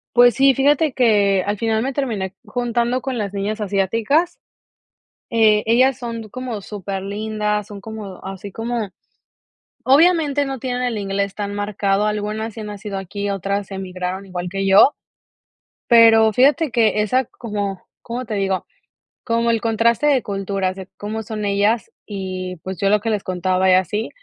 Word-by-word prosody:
Pues 245 0 +6
sí, 270 0 +5
fíjate 290 +2 +2
que 205 -6 +3
al 205 +1 -2
final 220 +1 0
me 270 +3 -1
terminé 225 -9 -2
j - - -38
juntando 240 0 -1
con 260 -1 -3
las 205 -2 -3
niñas 205 +2 -2
asiáticas. 215 - 0 0.9
Eh, 220 -2 +4
ellas 255 +3 +3
son 230 -3 -6
como 255 -3 -5
súper 195 -2 -5
lindas, 210 +1 -2
son 200 -1 -10
como 210 -3 -8
así 195 +1 -7
como. 225 +1 -3 0.9
Obviamente 295 0 +4
no 270 -1 -4
tienen 250 0 -3
el 245 -4 -1
inglés 200 0 -2
tan 205 -1 -4
marcado, 205 0 0
algunas 210 +1 -2
sí 220 - -9
han 210 - -6
nacido 205 -1 -6
aquí, 200 +2 -4
otras 200 +1 -2
emigraron 185 0 -5
igual 180 -1 -5
que 195 +1 -2
yo, 195 +9 +6 0.9
Pero, 225 -2 +6
fíjate 285 - +3
que 215 -2 +3
esa 255 +5 +1
como, 205 -5 -5 0.2
¿cómo 245 +2 -5
te 215 - -5
digo?, 195 -2 -1 0.6
como 230 0 +1
el 230 -1 0
contraste 230 +4 +2
de 275 -4 +3
culturas 195 -2 -2
de 190 -1 -9
cómo 215 +2 -4
son 215 -1 -5
ellas 205 +2 +1
y, 185 -2 -5
pues, 190 0 -5
yo 195 - +2
lo 210 +1 +4
que 225 - -2
les 210 -2 -1
contaba 185 +1 +1
y 185 - +6
así, 195 +5 +1
210 Hz, 165 wpm, -20 LUFS, 195-235 Hz, 0.9 s, Pues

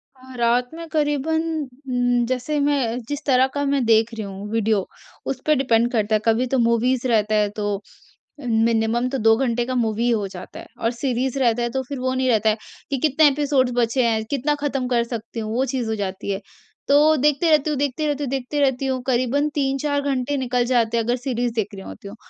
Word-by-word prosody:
अ, 260 0 -14
रात 240 +1 +2
में 335 0 -8
क़रीबन 300 +1 0 0.5
उम, 245 -1 +1
जैसे 255 +4 -1
मैं 275 -5 +1
जिस 290 0 -4
तरह 260 -1 +4
का 285 - -1
मैं 275 -1 +1
देख 225 +1 +3
रही 220 -2 -4
हूँ 200 +1 -7
वीडियो, 220 -3 +1 0.4
उस 270 -2 -3
पे 305 - +4
डिपेंड 240 -3 +2
करता 215 -2 +1
है। 215 - +1
कभी 230 +3 +2
तो - - +4
मूवीज़ 235 +2 +2
रहता 215 -2 +2
है 210 -1 +2
तो 205 -1 -1 0.6
मिनिमम 230 0 +1
तो 270 - -2
2 225 -1 +4
घंटे 240 -2 0
का 255 - -3
मूवी 225 -1 0
ही 240 - +2
हो 210 -4 0
जाता 185 -2 -10
है, - - -10
और 230 - 0
सीरीज़ 255 +1 -2
रहता 240 -2 +2
है 240 - 0
तो 265 +2 -2
फिर 280 -2 -5
वो 255 0 -1
नहीं 260 0 0
रहता 220 -1 +3
है, 215 - +2 0.3
कि 275 - 0
कितने 305 +2 +4
एपिसोड्स 275 -3 +2
बचे 245 +1 +2
हैं, 220 -1 +1
कितना 285 +1 0
ख़त्म 270 -3 -1
कर 240 -2 +2
सकती 230 -1 -6
हूँ, 215 -1 -4
वो 260 +2 +2
चीज़ 250 -3 -2
हो 220 - 0
जाती 200 0 -4
है। 195 - -3 0.5
तो 300 +2 +5
देखते 295 +4 +2
रहती 310 -1 +3
हूँ, 300 - -1
देखते 290 +2 -1
रहती 290 0 -1
हूँ, 265 - -3
देखते 270 +2 -2
रहती 270 -1 +1
हूँ, 260 -1 -1
क़रीबन 255 +3 +1
3-4 285 +1 0
घंटे 275 0 -1
निकल 250 -2 0
जाते 235 -2 +2
हैं 230 - +1
अगर 240 +2 +1
सीरीज़ 245 -2 -2
देख 220 -3 0
रही 195 - -9
होती 200 - -10
हूँ। 205 - -9
250 Hz, 225 wpm, -22 LUFS, 225-275 Hz, 0.6 s, तो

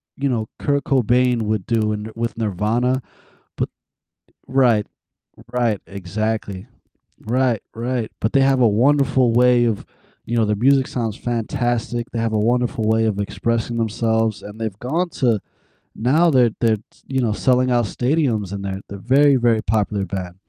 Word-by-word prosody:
you 140 0 -1
know, 110 -3 -1
Kurt 140 -1 0
Cobain 125 -2 +2
would 105 -3 -1
do 110 -2 +1
in 105 +1 -4
with 115 -1 -3
Nirvana, 115 +5 0 0.6
but - - -1 0.8
Right. 120 -6 +3 0.7
Right, 120 -5 0
exactly. 100 +1 -4 0.6
Right, 125 -2 +1
right. 120 0 -2
But 110 - 0
they 135 - +5
have 135 -1 +3
a 120 - +5
wonderful 130 +1 +3
way 125 0 +4
of 115 -4 -1 0.4
You 120 - -2
know, 115 - +3
their 105 0 0
music 135 -2 +4
sounds 115 -3 -3
fantastic, 120 0 -2
they 115 - -2
have 115 -1 -1
a - - +2
wonderful 120 +1 0
way 110 0 +3
of 105 -2 -1
expressing 115 +4 -2
themselves, 110 -1 0
and 105 +2 -10
they've 110 -3 -4
gone 165 +10 -1
to 115 -5 +3 0.6
now 150 +9 +3
they're 125 -3 +4
they're 110 -2 +3
t 100 - -20 0.2
you 130 -1 -1
know, 110 -3 +1
selling 125 +2 +2
out 120 -2 +2
stadiums, 120 - 0
and 100 0 -5
they're 95 0 -4
they're 100 - -7
a - - -14
very, 140 +3 +4
very 120 -2 +2
popular 105 -1 0
band. 90 -3 -5
115 Hz, 165 wpm, -20 LUFS, 105-125 Hz, 0.8 s, they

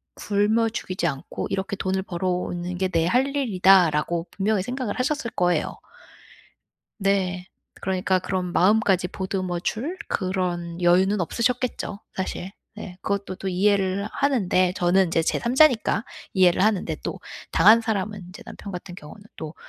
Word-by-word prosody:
굶어 215 +3 +1
죽이지 185 -5 -3
않고 140 -4 -4
이렇게 195 +1 -2
돈을 190 0 -1
벌어오는 180 -1 -3
게 190 +1 +1
내 165 -2 +1
할 250 +9 +2
일이다.'라고 180 - +3
분명히 200 0 0
생각을 250 -2 -4
하셨을 260 -2 -1
거예요. 175 -3 0 1.2
네. 190 -2 0 0.4
그러니까 185 0 +1
그런 180 -1 -3
마음까지 190 -1 +3
보듬어 185 -2 -3
줄 285 - -3
그런 180 -3 -2
여유는 185 +3 +3
없으셨겠죠, 235 +1 -1 0.2
사실. 190 0 -4 0.2
네. 195 -4 -9
그것도 200 -2 -3
또 195 - -4
이해를 195 +1 +1
하는데 200 -10 +2
저는 180 +2 +3
인제 165 0 +1
제 - - 0
3 235 +1 -2
자니까 250 -7 +4 0.3
이해를 185 -1 +4
하는데 210 -3 +1
또 - - -5 0.3
당한 225 +2 +6
사람은 210 -2 -2
인제 180 +3 -12
남편 200 - -9
같은 180 0 -7
경우는 180 +5 -12
또 155 0 -7
190 Hz, 315 characters per minute, -24 LUFS, 180-210 Hz, 1.2 s, 당한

